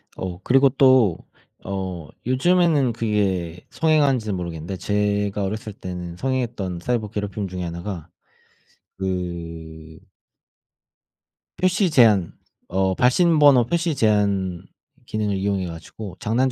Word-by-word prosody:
어. 90 Hz, -1 st, -5 dB
그리고 135 Hz, +2 st, +5 dB
또 130 Hz, -, +4 dB, 0.5 s
어 95 Hz, -4 st, -4 dB, 0.2 s
요즘에는 145 Hz, -1 st, +3 dB
그게 95 Hz, -6 st, -1 dB
성행하는지는 140 Hz, -10 st, +2 dB
모르겠는데 85 Hz, +1 st, -5 dB
제가 105 Hz, 0 st, 0 dB
어렸을 105 Hz, +2 st, -4 dB
때는 90 Hz, -3 st, -7 dB
성행했던 120 Hz, -6 st, -2 dB
사이버 110 Hz, +2 st, -2 dB
괴롭힘 105 Hz, -1 st, -4 dB
중에 90 Hz, -1 st, -5 dB
1 85 Hz, 0 st, -5 dB
가 85 Hz, -4 st, -6 dB, 0.9 s
그 85 Hz, -4 st, -5 dB, 1.6 s
표시 185 Hz, +1 st, +2 dB
제한 110 Hz, -, +4 dB, 0.3 s
어 95 Hz, +1 st, +1 dB
발신 155 Hz, -, +3 dB
번호 140 Hz, -5 st, +6 dB
표시 170 Hz, +3 st, 0 dB
제한 100 Hz, -6 st, +1 dB, 0.5 s
기능을 105 Hz, -2 st, -1 dB
이용해 95 Hz, -1 st, -1 dB
가지고 90 Hz, +4 st, -8 dB
장난 125 Hz, +4 st, +1 dB
100 Hz, 245 characters per minute, -22 LUFS, 90-125 Hz, 1.6 s, 번호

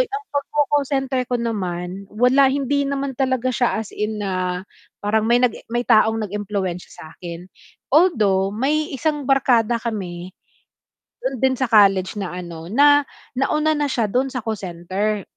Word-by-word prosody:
ang 425 Hz, -4 st, -2 dB
pagko-call 290 Hz, 0 st, +1 dB
center 270 Hz, -2 st, 0 dB
ko 245 Hz, -, +1 dB
naman, 190 Hz, -4 st, -4 dB
wala, 250 Hz, +5 st, +4 dB
hindi 280 Hz, +1 st, 0 dB
naman 275 Hz, -1 st, -2 dB
talaga 255 Hz, -1 st, 0 dB
siya 245 Hz, -2 st, +1 dB
as 220 Hz, -2 st, -6 dB
in 210 Hz, 0 st, -2 dB
na 185 Hz, -2 st, -2 dB, 0.3 s
parang 210 Hz, +1 st, +1 dB
may 240 Hz, -, +5 dB
nag 245 Hz, -2 st, +2 dB, 0.2 s
may 240 Hz, +1 st, -1 dB
taong 220 Hz, +1 st, +4 dB
nag-impluwensiya 195 Hz, -3 st, -4 dB
sa'kin. 170 Hz, +2 st, -9 dB, 0.5 s
Although 210 Hz, -, +3 dB
may 285 Hz, +9 st, 0 dB
isang 295 Hz, +1 st, -1 dB
barkada 245 Hz, -4 st, +3 dB
kami 185 Hz, -6 st, -5 dB, 0.9 s
dun 260 Hz, 0 st, -2 dB
din 265 Hz, -1 st, +2 dB
sa 255 Hz, -2 st, -1 dB
college 195 Hz, -2 st, +4 dB
na 190 Hz, -2 st, -4 dB
ano, 170 Hz, -2 st, -7 dB
na 290 Hz, +6 st, +5 dB, 0.3 s
nauna 305 Hz, +3 st, +2 dB
na 295 Hz, -, +1 dB
siya 240 Hz, -4 st, 0 dB
dun 260 Hz, +4 st, +1 dB
sa 255 Hz, -3 st, -5 dB
call 220 Hz, -2 st, -2 dB
center. 190 Hz, +3 st, -3 dB
230 Hz, 150 wpm, -21 LUFS, 195-270 Hz, 0.9 s, may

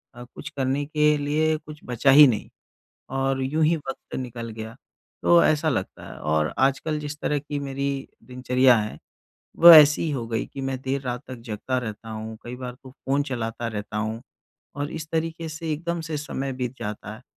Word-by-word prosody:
अ, 120 Hz, -, -9 dB
कुछ -, -, -7 dB
करने 135 Hz, +1 st, -1 dB
के 150 Hz, 0 st, +2 dB
लिए 155 Hz, +2 st, +1 dB
कुछ 150 Hz, -1 st, -12 dB
बचा 125 Hz, +3 st, +2 dB
ही 145 Hz, +2 st, +10 dB
नहीं 115 Hz, -5 st, -1 dB, 0.7 s
और 135 Hz, 0 st, 0 dB
यूँ 155 Hz, +4 st, +1 dB
ही 165 Hz, +2 st, +3 dB
वक़्त 135 Hz, -3 st, -8 dB
निकल 120 Hz, -2 st, -5 dB
गया। 110 Hz, +1 st, -8 dB, 0.5 s
तो 170 Hz, 0 st, +6 dB
ऐसा 155 Hz, +1 st, +2 dB
लगता 110 Hz, -10 st, -3 dB
है -, -, -10 dB
और 75 Hz, 0 st, 0 dB
आजकल 135 Hz, +3 st, +1 dB
जिस 150 Hz, 0 st, -6 dB
तरह 150 Hz, -, 0 dB
की 145 Hz, +1 st, -5 dB
मेरी 140 Hz, 0 st, -3 dB, 0.2 s
दिनचर्या 125 Hz, 0 st, +3 dB
है 105 Hz, 0 st, -4 dB, 0.6 s
वो 170 Hz, +1 st, +11 dB
ऐसी 155 Hz, 0 st, +8 dB
हो 120 Hz, -5 st, -3 dB
गई 115 Hz, -1 st, -2 dB
कि 135 Hz, -, -5 dB
मैं 135 Hz, -1 st, -2 dB
देर 135 Hz, +1 st, -2 dB
रात 125 Hz, -2 st, -4 dB
तक 130 Hz, -, -6 dB
जगता 115 Hz, +4 st, -3 dB
रहता 115 Hz, -2 st, -5 dB
हूँ, 110 Hz, 0 st, -6 dB
कई 120 Hz, +1 st, -6 dB
बार 125 Hz, -1 st, -7 dB
तो 130 Hz, -, -11 dB
फ़ोन 140 Hz, +1 st, -1 dB
चलाता 120 Hz, -3 st, -4 dB
रहता 105 Hz, -1 st, -5 dB
हूँ 110 Hz, +1 st, -3 dB, 0.6 s
और 145 Hz, +1 st, -3 dB
इस 155 Hz, -1 st, -6 dB
तरीके 165 Hz, 0 st, -2 dB
से 160 Hz, 0 st, -4 dB
एकदम 170 Hz, +3 st, -3 dB
से 160 Hz, -1 st, -4 dB
समय 135 Hz, -2 st, -4 dB
बीत 125 Hz, -1 st, -4 dB
जाता 105 Hz, 0 st, -6 dB
है। 110 Hz, -, -14 dB
135 Hz, 195 wpm, -24 LUFS, 120-150 Hz, 0.7 s, वो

